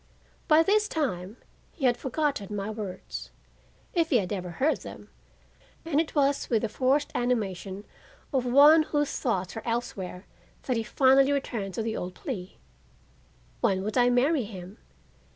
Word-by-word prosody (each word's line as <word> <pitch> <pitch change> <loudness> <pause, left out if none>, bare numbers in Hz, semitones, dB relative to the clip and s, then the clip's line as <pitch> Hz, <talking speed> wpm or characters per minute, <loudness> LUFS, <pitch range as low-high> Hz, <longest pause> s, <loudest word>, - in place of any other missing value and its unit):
By 315 0 +6
this 420 +3 +3
time 220 - -3 0.4
he 285 - -3
had 245 -1 +4
forgotten 265 -6 -2
my 200 +1 -3
words, 205 -4 -6 0.6
if 335 -2 +1
he 260 - +4
had 195 -3 -1
ever 180 -3 -4
heard 270 - +1
them - - -11 0.7
and 315 -2 +2
it 325 - -6
was 280 -1 +1
with 225 -2 +1
the 225 - 0
forced 265 +6 +1
animation 200 -5 -2 0.5
of 260 -2 +2
one 285 +6 +7
whose 295 -2 -1
thoughts 190 -7 -1
are 225 - -4
elsewhere 210 -6 -4 0.4
that 255 - -1
he 230 - 0
finally 270 +4 +4
returned 225 -9 -2
to 225 - -2
the 225 0 -2
old 180 0 -5
plea: 195 - -6 1.0
When 190 -1 +1
would 215 +1 -3
I 245 -1 +4
marry 260 +3 +2
him? 190 -1 -10
245 Hz, 155 wpm, -27 LUFS, 200-280 Hz, 1.0 s, one